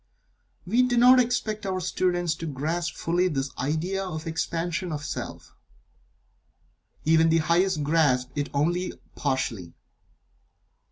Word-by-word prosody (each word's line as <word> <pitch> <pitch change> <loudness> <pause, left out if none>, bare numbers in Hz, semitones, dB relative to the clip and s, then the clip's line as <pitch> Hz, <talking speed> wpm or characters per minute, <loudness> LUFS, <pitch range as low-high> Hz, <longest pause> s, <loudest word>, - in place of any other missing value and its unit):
We 230 +7 +3
do 250 -1 +2
not 250 +2 +7
expect 230 -3 0
our 190 -1 -2
students 175 -1 0
to 165 - -5
grasp 155 +4 -2
fully 175 +2 +1
this 135 -5 -2
idea 160 +8 -1
of 160 -5 -5
the 165 - -4
Expansion 170 +2 -2
of 150 -1 -4
Self. - - -6 1.5
Even 160 +1 +4
the 165 - +4
highest 170 +1 +2
grasp 145 -5 +2
it 145 0 -2
only 175 +6 0 0.2
partially. 115 - -2
165 Hz, 125 wpm, -26 LUFS, 150-185 Hz, 1.5 s, not